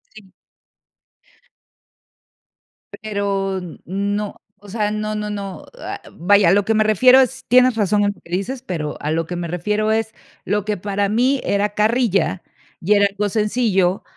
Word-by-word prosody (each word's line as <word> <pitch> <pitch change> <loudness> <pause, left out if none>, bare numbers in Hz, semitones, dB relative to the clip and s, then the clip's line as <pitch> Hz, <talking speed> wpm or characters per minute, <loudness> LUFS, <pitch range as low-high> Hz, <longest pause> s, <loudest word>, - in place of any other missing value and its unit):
Sí. 200 -3 -15 2.7
Pero 200 -3 -2 0.2
no, 200 +3 -3 0.2
o 205 0 -16
sea, 210 0 -1
no, 215 0 -3
no, 210 0 -3
no, 200 -2 -6
ah, - - -6
vaya, 200 +1 +4
a - - +5
lo 200 0 +2
que 225 - +1
me 215 0 +3
refiero 250 +5 +6
es, 265 0 0
tienes 255 0 +5
razón 210 -1 +1
en 205 - +2
lo - - -23
que 170 - -18
dices, 220 +9 -3
pero 160 - -4
a 150 - -3
lo 165 +1 0
que 180 - -5
me 175 -1 -4
refiero 210 +6 -1
es 220 0 -1 0.3
lo 205 +1 -1
que 210 -1 -1
para 200 +2 -1
mí 255 +6 +2
era 200 +1 +1
carrilla 210 -4 +1 0.4
y 195 +5 +3
era 205 -1 +4
algo 205 +1 -2
sencillo, 210 -3 +1
205 Hz, 165 wpm, -20 LUFS, 195-215 Hz, 2.7 s, refiero